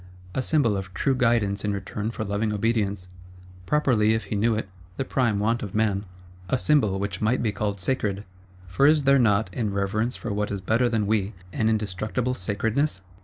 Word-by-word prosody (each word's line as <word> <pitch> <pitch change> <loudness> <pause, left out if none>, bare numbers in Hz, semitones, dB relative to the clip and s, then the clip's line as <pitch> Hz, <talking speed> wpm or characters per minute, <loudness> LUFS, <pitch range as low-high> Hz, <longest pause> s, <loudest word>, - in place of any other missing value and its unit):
A - - 0
Symbol 135 -7 +2
of 95 -1 -5
true 135 - +1
Guidance 115 -6 +1
in 105 -1 0
return 100 +2 -4
for 115 - -4
loving 105 +1 -1
Obedience; 105 -3 0 0.6
properly, 115 -7 +3
if 110 - -2
he 105 - -4
knew 110 +2 +2
it, 105 -2 -3 0.3
the 135 - -1
prime 120 -6 +1
want 115 +3 +1
of 100 -1 -6
man. 105 -2 +1 0.4
A 130 - +2
Symbol 125 -9 +2
which 100 -1 -3
might 110 +4 +1
be 110 - +1
called 100 -1 -2
sacred; 100 -1 -1 0.4
for 90 +11 +3
is 150 -1 +4
there 140 0 +5
not, 105 -5 +2
in 110 -1 -1
reverence 105 +5 -1
for 115 - -4
what 105 0 -1
is 100 - -3
better 115 +6 +1
than 110 -3 0
we, 105 0 0 0.2
an 110 - +1
indestructible 110 +4 -1
sacredness? 105 +4 -1
105 Hz, 190 wpm, -25 LUFS, 100-120 Hz, 0.6 s, there